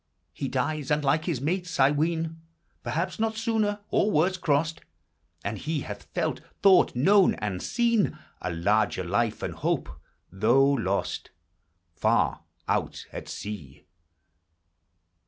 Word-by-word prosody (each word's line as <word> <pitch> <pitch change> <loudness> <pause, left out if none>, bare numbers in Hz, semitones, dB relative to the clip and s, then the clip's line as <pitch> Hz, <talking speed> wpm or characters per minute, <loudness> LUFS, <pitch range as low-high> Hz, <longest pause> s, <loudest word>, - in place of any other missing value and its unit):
He 135 - -3
dies 140 +3 -2
unlike 150 +1 +2
his 155 -9 -1
mates, 180 +3 -2
I 135 +1 +6
ween; 160 +2 -1 0.4
Perhaps 170 +6 -2
not 220 0 0
sooner, 220 -2 0
or 210 - +3
worse 185 +1 +2
crossed; 155 -2 0 0.6
And 100 +1 -3
he 155 -1 -2
hath 105 -4 -7
felt, - - -2 0.2
thought, 195 -8 +6
known, 190 +9 +5
and 100 -4 -3
sew 235 -4 +2 0.3
A 90 - -2
larger 100 +3 +1
life 105 +5 0
and - - -2
hope - - -1 0.3
— - - -45
though 120 +9 +4
Lost 100 -8 -1 0.6
Far 80 - +1 0.3
"in - - +1 0.2
at - - -7
sea 80 -10 -7
150 Hz, 130 wpm, -27 LUFS, 110-180 Hz, 0.6 s, I